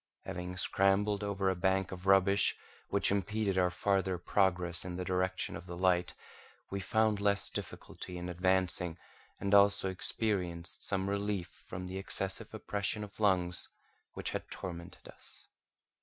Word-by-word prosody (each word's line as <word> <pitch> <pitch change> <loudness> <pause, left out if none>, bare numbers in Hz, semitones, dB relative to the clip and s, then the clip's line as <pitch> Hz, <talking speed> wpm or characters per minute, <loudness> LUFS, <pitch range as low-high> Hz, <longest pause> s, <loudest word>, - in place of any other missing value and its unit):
Having 90 -1 -5
scrambled 100 +2 +2
over 100 -1 -1
a 95 - +2
bank 95 +1 +1
of 95 0 -7
rubbish 95 +1 +5 0.3
which 100 -1 +2
impeded 100 0 0
our 90 -1 +3
farther 95 0 +1
progress 90 -1 +1
in 90 -1 -5
the 90 0 -3
direction 95 0 -1
of 90 - -8
the 85 -1 -6
light, 90 -1 +2 0.6
we 100 - -2
found 110 +1 +2
less 100 0 +1
difficulty 90 - -7
in 90 0 -5
advancing 90 -1 +1 0.4
and 100 0 -1
also 100 -1 +5
experienced 90 -3 -1
some 95 -1 0
relief 100 -2 -1
from 90 +3 -8
the 95 +1 -4
excessive 95 0 -1
oppression 105 +1 -3
of 105 +1 -10
lungs 90 -4 +2 0.4
which - - -4
had - - -4
tormented 85 -1 -7
us. - - -13
95 Hz, 145 wpm, -33 LUFS, 90-100 Hz, 0.6 s, rubbish